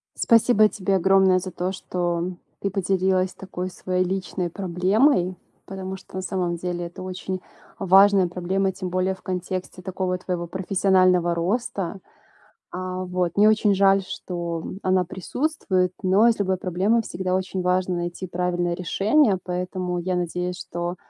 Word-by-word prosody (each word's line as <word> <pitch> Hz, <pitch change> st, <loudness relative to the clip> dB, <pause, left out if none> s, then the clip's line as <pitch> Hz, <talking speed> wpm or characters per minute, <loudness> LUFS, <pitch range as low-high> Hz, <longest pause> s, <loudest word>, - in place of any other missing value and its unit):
Спасибо 230 Hz, -2 st, +5 dB
тебе 195 Hz, 0 st, -1 dB
огромное 190 Hz, 0 st, +4 dB
за 185 Hz, 0 st, -6 dB
то, 180 Hz, +2 st, -2 dB
что 175 Hz, -1 st, -2 dB, 0.3 s
ты 200 Hz, -, -1 dB
поделилась 190 Hz, -1 st, +1 dB
такой 185 Hz, -1 st, -6 dB
своей 185 Hz, 0 st, -1 dB
личной 185 Hz, -1 st, -2 dB
проблемой, 185 Hz, -, +2 dB, 0.3 s
потому 190 Hz, 0 st, -6 dB
что 190 Hz, -, -14 dB
на 190 Hz, -, -2 dB
самом 180 Hz, -2 st, -2 dB
деле 175 Hz, 0 st, -3 dB
это 175 Hz, +2 st, -10 dB
очень 185 Hz, 0 st, -5 dB, 0.4 s
важная 195 Hz, -1 st, +5 dB
проблема, 190 Hz, +2 st, -1 dB
тем 185 Hz, -1 st, -5 dB
более 185 Hz, +1 st, 0 dB
в 190 Hz, -, -14 dB
контексте 185 Hz, 0 st, -4 dB
такого 185 Hz, 0 st, -2 dB
твоего 180 Hz, -2 st, -4 dB
профессионального 185 Hz, -2 st, +2 dB
роста. 195 Hz, 0 st, -2 dB, 0.7 s
А, 185 Hz, 0 st, -4 dB
вот. 180 Hz, -1 st, -2 dB
Мне 210 Hz, +1 st, +6 dB
очень 210 Hz, -2 st, +3 dB
жаль, 195 Hz, 0 st, +4 dB
что, 170 Hz, -3 st, -5 dB
м, 190 Hz, -, -6 dB
она 185 Hz, -1 st, +2 dB
присутствует, 185 Hz, -, -1 dB
но 195 Hz, +5 st, +5 dB
из 230 Hz, -, +2 dB
любой 190 Hz, -2 st, +1 dB
проблемы 195 Hz, +6 st, +1 dB
всегда 185 Hz, -2 st, -3 dB
очень 185 Hz, 0 st, -2 dB
важно 180 Hz, 0 st, +1 dB
найти 175 Hz, +2 st, -4 dB
правильное 175 Hz, 0 st, -1 dB
решение, 195 Hz, -, +2 dB
поэтому 180 Hz, 0 st, -3 dB
я 180 Hz, +1 st, -1 dB
надеюсь, 180 Hz, +1 st, -2 dB
что 175 Hz, +1 st, -4 dB
185 Hz, 150 wpm, -24 LUFS, 180-195 Hz, 0.7 s, Мне